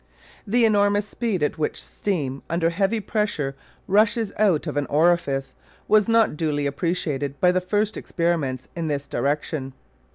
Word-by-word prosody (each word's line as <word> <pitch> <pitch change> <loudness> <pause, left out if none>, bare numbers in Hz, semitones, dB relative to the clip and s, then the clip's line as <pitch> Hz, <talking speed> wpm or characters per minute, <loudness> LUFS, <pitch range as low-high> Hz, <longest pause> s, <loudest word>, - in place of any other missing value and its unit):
The 235 +3 +3
enormous 205 -1 +3
speed 205 -6 -2
at 150 - -1
which 150 - -1
steam 140 -9 -3
under 170 0 +1
heavy 195 +5 +1
pressure 195 -10 -2 0.3
rushes 210 +2 +2
out 195 -8 +3
of - - -4
an 145 -1 0
orifice 145 -4 +1 0.3
was 215 0 +4
not 225 -6 +3
duly 150 -2 -1
appreciated 145 -2 -2
by 180 - +5
the 185 0 +1
first 205 +4 0
experimenters 160 -7 -1
in 165 -2 -2
this 140 -2 -2
direction. 140 -1 -2
170 Hz, 150 wpm, -23 LUFS, 145-205 Hz, 0.3 s, by